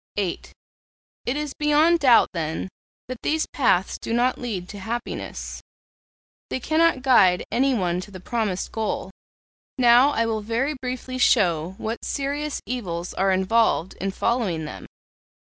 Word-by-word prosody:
VIII. 190 -4 -1 0.9
'It 250 +4 0
is 295 -2 -3
beyond 305 +3 +3
doubt, 250 -6 +5
then, 160 +2 -3 0.4
that 255 -1 -7
these 315 +1 0
paths 190 -9 +1
do 230 - -4
not 245 +2 +1
lead 200 -8 -4
to 205 - -8
happiness; 235 +4 -5 0.9
they - - -2
cannot 315 0 +2
guide 195 -9 +5
anyone 215 -9 +1
to 195 - -10
the 190 -2 -10
promised 210 -2 -2
goal. 215 -3 -3 0.7
Now, 245 +2 +6
I 230 -5 0
will 220 -1 -1
very 235 +7 -1
briefly 255 -1 -5
show 180 -8 +2
what 225 +2 -4
serious 285 +2 -3
evils 180 -9 -4
are 195 0 +1
involved 190 -1 +2
in 195 - -1
following 195 -6 -1
them. 150 - -8
230 Hz, 140 wpm, -24 LUFS, 190-260 Hz, 0.9 s, Now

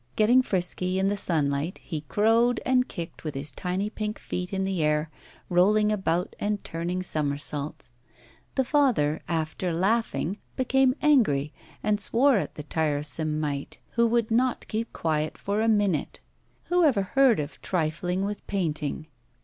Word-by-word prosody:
Getting 235 +4 +5
frisky, 185 -3 -1
in 190 +1 +2
the 205 - 0
sunlight, 155 -3 0
he 160 -4 -6
crowed 225 - +2
and 255 0 +3
kicked 170 -1 -7
with 155 -3 -4
his 140 +1 0
tiny 180 +7 -2
pink 215 0 -4
feet 180 0 -5
in 195 -1 -1
the 190 -3 -1
air, 150 +1 +1 0.4
rolling 210 +4 +3
about 180 -4 -1
and 205 0 -1
turning 175 +3 -3
somersaults. 145 -4 -2 0.6
The 265 - +3
father, 240 - +2
after 165 +2 -2
laughing, 200 +1 0 0.2
became 260 0 +2
angry, 185 - +3 0.3
and 210 -1 +1
swore 250 +5 +4
at - - -3
the 150 - -6
tiresome 155 0 -1
mite, 145 -2 -3
who 235 0 +3
would 230 -1 +1
not 250 +2 +1
keep 225 +1 -3
quiet 155 -1 -1
for 205 +2 -1
a 225 - +1
minute. 205 -8 +1 0.5
Who 355 0 +3
ever 245 -11 +3
heard 260 - +3
of 145 +1 -5
trifling 180 +2 -1
with 205 0 -5
painting? 155 -6 -2
185 Hz, 150 wpm, -26 LUFS, 155-220 Hz, 0.6 s, Getting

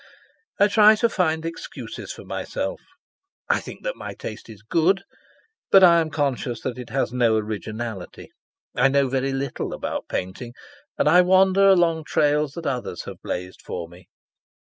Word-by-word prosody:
I 205 - +6
try 215 +1 +6
to 235 +2 +1
find 160 -6 0
excuses 165 - -7
for - - -10
myself. - - -4 0.7
I - - +3
think - - -10
that - - -3
my - - -8
taste 110 +1 -8
is 105 -2 -13
good, 170 - +2 0.7
but 195 - +7
I 170 -2 +7
am 160 - -2
conscious 140 -5 -2
that 125 -1 -4
it 125 - -8
has 130 0 -1
no 120 -3 +3
originality. 110 -1 -5 0.4
I 125 +2 +4
know 140 0 +2
very 135 +1 -1
little 135 -1 -3
about - - -4
painting, 110 +7 -4 0.4
and - - +2
I 175 +4 +7
wander 190 +2 +4
along 170 -4 +3
trails 150 -1 +1
that 170 0 -7
others 125 -9 -3
have - - -10
blazed 90 +1 -5
for 85 -2 -6
me. 90 +1 -17
140 Hz, 165 wpm, -23 LUFS, 115-175 Hz, 0.7 s, but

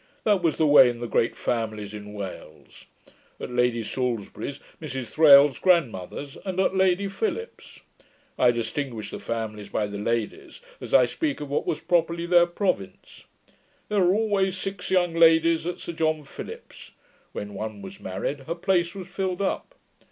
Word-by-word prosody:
That 205 -3 +3
was 165 -3 +1
the 160 - +2
way 145 -4 +7
in 120 -1 -5
the 120 - -4
great 115 0 0
families 110 -3 -3
in 105 0 -9
Wales; 100 -3 -9 0.5
at - - -6
Lady 125 -1 +1
Salisbury's, 120 -3 -3 0.2
Mrs 130 -3 -5
Thrale's 145 -3 +7
grandmother, 140 - +1 0.2
and 190 -2 -3
at 190 0 +2
Lady 190 +1 +2
Philips's. 445 - -5 0.5
I 125 - +4
distinguish 120 0 -3
the - - -6
families 110 -3 -5
by 105 - -1
the 100 0 -6
ladies, 115 0 -3 0.2
as - - -8
I - - +6
speak 310 -4 -2
of 145 -2 -7
what 145 - -1
was 155 - -1
properly 170 0 +1
their 175 0 +5
province. 175 - -3 0.6
There 210 -2 +2
were 180 +1 +4
always 200 -4 +1
six 195 0 -5
young 175 -2 +2
ladies 165 0 +4
at 175 - -3
Sir 170 - -6
John 155 -1 0
Philips's: 140 - -10 0.4
when 105 0 -6
one 105 0 -6
was 95 0 -10
married, 95 +10 -4
her 165 - -2
place 175 0 0
was 185 -2 -7
filled 185 -1 -3
up. - - -3
155 Hz, 165 wpm, -25 LUFS, 115-180 Hz, 0.6 s, way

